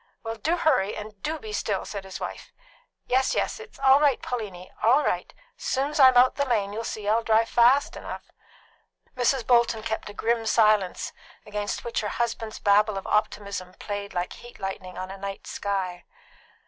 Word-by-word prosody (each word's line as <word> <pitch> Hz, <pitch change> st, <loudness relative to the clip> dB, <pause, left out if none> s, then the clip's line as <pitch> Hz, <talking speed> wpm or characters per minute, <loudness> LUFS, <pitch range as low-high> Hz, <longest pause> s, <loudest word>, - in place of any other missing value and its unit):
"Well, 225 Hz, 0 st, -3 dB
do 320 Hz, +11 st, 0 dB
hurry, 210 Hz, -, +2 dB
and 210 Hz, -1 st, -9 dB
do 315 Hz, +7 st, -2 dB
be 220 Hz, -7 st, -8 dB
still!" 205 Hz, -2 st, -1 dB
said 200 Hz, -2 st, -6 dB
his 190 Hz, -, -7 dB
wife. -, -, -6 dB, 0.5 s
"Yes, 260 Hz, +1 st, +2 dB
yes. -, -, -1 dB
It's 450 Hz, 0 st, -12 dB
all 270 Hz, 0 st, +6 dB
right, 285 Hz, -4 st, +3 dB
Pauliny; 200 Hz, -7 st, -5 dB
all 260 Hz, +7 st, +5 dB
right. -, -, -1 dB, 0.3 s
Soon's 285 Hz, +3 st, -1 dB
I'm 260 Hz, -2 st, +8 dB
out 250 Hz, +1 st, +5 dB
the 280 Hz, -, +1 dB
lane, 210 Hz, -6 st, 0 dB
you'll 225 Hz, +2 st, -3 dB
see't 215 Hz, -2 st, -5 dB
I'll 220 Hz, +2 st, +3 dB
drive 225 Hz, 0 st, +3 dB
fast 250 Hz, +4 st, +4 dB
enough." -, -, -8 dB, 0.8 s
Mrs. 250 Hz, -1 st, +1 dB
Bolton 235 Hz, -3 st, +3 dB
kept 220 Hz, -1 st, -3 dB
a -, -, -9 dB
grim 230 Hz, 0 st, 0 dB
silence, 215 Hz, -5 st, +2 dB, 0.3 s
against 205 Hz, 0 st, -3 dB
which 235 Hz, -, -2 dB
her 210 Hz, -, -2 dB
husband's 230 Hz, -1 st, -2 dB
babble 205 Hz, 0 st, +3 dB
of 195 Hz, -, -5 dB
optimism 200 Hz, -3 st, -1 dB
played 205 Hz, -1 st, -5 dB
like 175 Hz, 0 st, -2 dB
heat 240 Hz, 0 st, -13 dB
lightning 190 Hz, -2 st, -5 dB
on 185 Hz, +1 st, -5 dB
a 195 Hz, -, -7 dB
night 195 Hz, 0 st, -6 dB
sky. 190 Hz, -3 st, -3 dB
220 Hz, 180 wpm, -26 LUFS, 200-245 Hz, 0.8 s, I'm